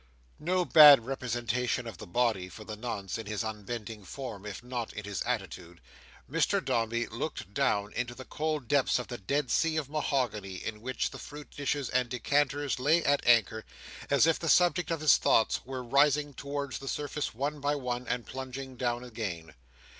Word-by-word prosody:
No 180 +3 +1
bad 145 -8 +9
representation 125 -2 -2
of 110 -7 -8
the - - -9
body, 105 -3 0
for 110 - -10
the 110 0 -7
nonce, 105 -3 -4
in 110 - -7
his 105 +1 -2
unbending 110 0 -6
form, 105 -1 -7
if 100 +3 -7
not 120 -2 -4
in 105 - -6
his 100 -3 -4
attitude, 85 -1 -4 0.5
Mr - - +1
Dombey 115 +1 0
looked 115 - -5
down 105 -7 +1
into 120 0 -3
the 130 - -9
cold 155 -4 -2
depths 140 0 +3
of 125 - -5
the 120 - -5
dead 140 +7 -1
sea 160 -1 +2
of 145 -3 -3
mahogany 110 -11 -1
on 105 -1 -5
which 130 +2 -2
the - - -9
fruit 150 0 -10
dishes 145 -1 -2
and 125 -1 +1
decanters 140 +3 0
lay 155 +6 +3
at 140 0 +2
anchor: 110 -2 +4 0.5
as 140 0 +5
if 165 -1 +2
the 165 - -2
subjects 175 +2 +4
of 165 -2 -1
his 155 -4 +6
thoughts 110 - +2
were 130 -1 -5
rising 145 +3 +3
towards 140 0 -4
the 135 - -9
surface 145 -3 -3
one 145 +4 -2
by 145 +1 0
one, 125 -2 -3
and 125 -1 -2
plunging 130 0 -7
down 120 -1 -1
again. 95 - -5
125 Hz, 185 wpm, -30 LUFS, 110-145 Hz, 0.5 s, bad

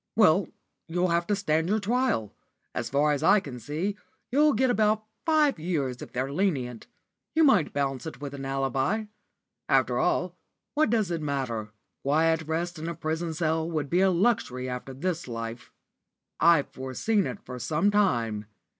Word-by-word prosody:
"Well, 195 -4 +5 0.4
you'll 180 +2 0
have 170 0 +1
to 205 - +2
stand 165 -4 0
your 215 +2 +2
trial. 215 - 0 0.4
As 120 - -3
far 145 +3 +3
as 145 -1 0
I 205 +6 +6
can 135 -9 -8
see, 160 - -3 0.4
you'll 295 +3 +4
get 255 +3 +2
about 215 -1 +2 0.2
five 305 - +3
years 145 -7 -2
if - - -8
they're 130 +3 -2
lenient. 135 - -1 0.5
You 320 - +5
might 210 - +4
bounce 140 +1 -2
it 160 - -8
with 145 -1 -6
an 140 -1 -6
alibi. 135 - 0 0.6
After - - +3
all, - - +1 0.4
what 305 -2 +2
does 215 -5 +1
it 165 -2 -2
matter? 130 -7 -2 0.3
Quiet 160 +3 +2
rest 170 +1 -2
in 165 +2 -4
a 170 - -4
prison 160 +2 -3
cell 160 0 0
would 150 -4 -3
be 180 +2 +4
luxury 180 - +1
after 125 +1 -5
this 170 +2 -2
life. 115 0 -6 0.7
I've 165 -4 +5
foreseen 130 - -1
it 205 - -5
for 125 -1 -7
some 155 - +1
time. 120 - +1
160 Hz, 165 wpm, -27 LUFS, 135-200 Hz, 0.7 s, I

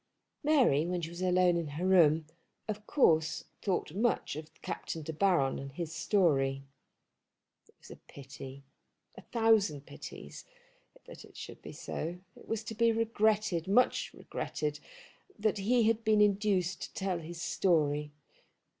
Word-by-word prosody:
Mary, 255 - +4
when 180 0 -1
she 165 -1 -5
was 170 +1 -8
alone 180 -1 +3
in 170 -2 -1
her 150 +5 -4
room, 165 -4 +5 0.4
of 210 0 -5
course 160 - +3 0.2
thought 185 -6 -1
much 220 -5 0
of 155 +1 -8
Captain 160 - -5
De 160 - -5
Baron 165 -6 +2
and 135 0 -8
his 160 +1 -5
story. 145 -6 +1 1.0
It - - -26
was - - -15
a - - -10
pity, 135 0 -10 0.5
a - - -10
thousand 215 - +2
pities, - - -10 0.6
that - - -11
it - - -16
should - - -9
be - - -9
so. 170 +3 -5 0.2
It - - -16
was 225 -1 -2
to 225 0 -6
be 230 +1 +3
regretted, 215 -5 +1
much 230 +6 +3
regretted, 150 -1 -4 0.6
that 215 -1 0
he 235 +4 +3
had 225 +1 +2
been 215 -1 +3
induced 200 -3 +2
to - - -7
tell 190 -3 -1
his 165 +1 -8
story. 150 -5 +1
180 Hz, 150 wpm, -31 LUFS, 155-215 Hz, 1.0 s, room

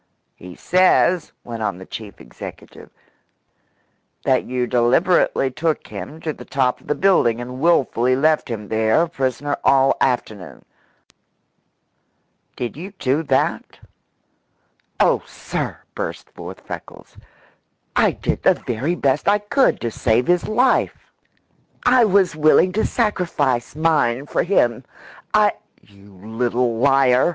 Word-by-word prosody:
"He 90 0 -12
says," 185 -1 +2
went 115 -2 -7
on 105 -4 -2
the 95 - -11
chief 105 -1 -9
executive, - - -11 1.4
"that 130 -1 +2
you 125 0 -2
deliberately 130 +4 +2
took 160 +3 -2
him 105 - -8
to 155 - -3
the - - -12
top 130 -2 -1
of - - -21
the 150 - 0
building 175 -12 +2
and 125 +1 -7
wilfully 130 -6 +2
left 155 +1 +1
him 105 -3 -6
there 110 +7 +2
a - - -2
prisoner 135 -2 -2
all 135 0 +4
afternoon. 110 -7 -2 1.9
Did 120 -2 -5
you 190 +5 -8
do 135 +4 0
that?" 140 -4 -1 1.2
"Oh, - - +3
sir," - - -5 0.2
burst - - -6
forth - - -10
Freckles, - - -10 0.8
"I - - +4
did - - -3
the - - +4
very 130 +9 -3
best 140 -3 0
I 205 +1 +5
could 210 +6 +1
to 115 - -2
save 115 +2 +1
his 175 -1 +1
life! 250 +4 0 0.7
I 250 -1 +5
was 190 -5 +2
willing 155 +4 +4
to 215 +4 0
sacrifice 165 - -1
mine 150 -5 +1
for - - -1
him. 120 - +1 0.5
I - - +4 0.2
" - - -35
"You 100 0 -20
little 120 +1 -1
liar!" 135 0 +4
135 Hz, 130 wpm, -20 LUFS, 120-170 Hz, 1.9 s, I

